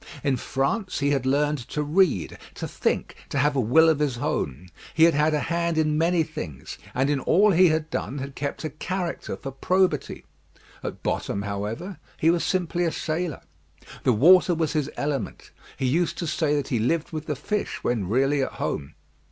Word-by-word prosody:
In 140 -2 +2
France 140 - -1
he 140 0 +1
had 135 -2 0
learned 145 +2 +2
to 150 - -2
read, 150 - +1 0.2
to - - -4
think, - - -2
to - - -3
have 145 +1 +2
a - - +2
will 130 +8 +5
of 160 -2 +3
his 140 -5 0
own. 75 - -3 0.3
He 160 - +5
had 165 0 +6
had 150 +1 +2
a 150 - 0
hand 170 0 -1
in 155 -1 +2
many 165 +1 +2
things, 120 - -7 0.2
and 130 +2 +2
in 145 -1 +1
all 200 +9 +4
he 185 +1 +6
had 155 -1 0
done 140 - -3
had 140 0 -5
kept 140 +4 -4
a 155 - -3
character 175 +3 -4
for 135 - -6
probity. 180 +2 0 0.6
At - - -6
bottom, 100 - -2
however, 105 - -4 0.2
he 165 - +4
was 170 -1 0
simply 175 -1 0
a 165 - +1
sailor. 160 -1 -3 0.6
The 130 - +4
water 175 - +6
was 160 -1 -1
his 150 -2 0
element; 140 -6 -3 0.3
he 130 - -1
used 165 +7 +1
to 175 - -3
say 155 -1 +1
that 145 - -2
he 120 - +1
lived 155 +8 0
with 155 -1 -5
the 150 - -1
fish 210 +10 -3
when 110 -7 -1
really 135 +5 +2
at 130 - -2
home. 70 +2 -4
150 Hz, 195 wpm, -25 LUFS, 135-165 Hz, 0.6 s, had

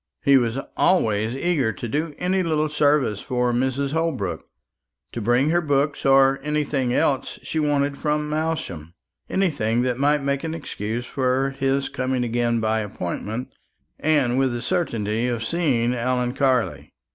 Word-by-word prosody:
He 140 -2 +5
was 120 -2 +2 0.2
always 110 - +2
eager 140 -6 +1
to 110 +5 -6
do 150 +5 -2
any 185 +1 +1
little 155 -3 0
service 145 -8 +2
for 125 -2 0
Mrs. 130 +3 0
Holbrook; 155 - -2 0.6
to 120 - -5
bring 120 +7 +2
her 175 +1 +3
books 145 -2 0
or 135 0 +5
anything 145 -3 -1
else 135 +2 0
she 160 - -2
wanted 145 -2 0
from 150 0 0
Malsham 150 - -3 0.3
anything 125 - +1
that 125 -1 -1
might 145 +1 +2
make 140 +1 -1
an 160 0 -3
excuse 120 -6 -4
for 130 +1 0
his 135 0 0
coming 130 -2 -1
again 120 0 0
by 110 0 +1
appointment, 105 +4 -5 0.5
and 140 -5 +2
with 135 -2 +1
the 120 - -4
certainty 115 - -1
of 120 -2 -2
seeing 125 -6 +1
Ellen 125 0 0
Carley. 125 - 0
135 Hz, 150 wpm, -23 LUFS, 120-150 Hz, 0.6 s, He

